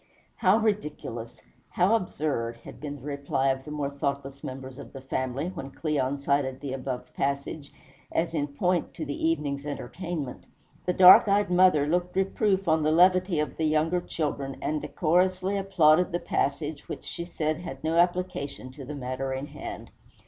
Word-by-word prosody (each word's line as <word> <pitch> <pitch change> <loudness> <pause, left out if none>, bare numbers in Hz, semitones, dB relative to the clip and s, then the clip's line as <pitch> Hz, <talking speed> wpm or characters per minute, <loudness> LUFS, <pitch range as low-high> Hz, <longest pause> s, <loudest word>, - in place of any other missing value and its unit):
"How 190 +3 +4
ridiculous! 150 - -3 0.3
how 185 +4 +2
absurd!" 145 - -1
had - - -11
been 145 -1 -5
the 140 - -12
reply 140 -2 0
of 130 0 -1
the - - -8
more 145 -2 -2
thoughtless 140 -1 -3
members 130 0 -7
of - - -10
the 135 - -8
family, 130 +4 -2
when 165 -7 -7
Cleon 140 -2 -1
cited 140 -2 0
the 135 -2 -5
above 130 -1 -5
passage 140 +1 -2 0.4
as 165 0 0
in 145 -3 0
point 175 +5 -1
to 155 - -4
the 145 +2 -1
evening's 145 -3 -1
entertainment. 150 0 -5 0.4
The 180 - +2
dark 185 +6 +9
eyed 200 -1 +2
mother 180 -5 +5
looked 175 +4 0
reproof 195 0 +1
on 160 0 +3
the 155 0 +2
levity 180 0 +4
of 150 - -2
the 160 - 0
younger 155 +3 +2
children, 140 -5 -3
and 155 0 -1
decorously 185 +3 +1
applauded 180 -4 +4
the 175 - 0
passage, 145 0 -2
which - - -6
she 170 - -5
said 155 -3 -2
had 155 -6 -8
no 160 +1 0
application 175 -7 0
to 135 +1 -10
the 150 +3 -6
matter 130 0 -3
in 135 +1 -3
hand. - - -8
150 Hz, 170 wpm, -27 LUFS, 140-180 Hz, 0.4 s, dark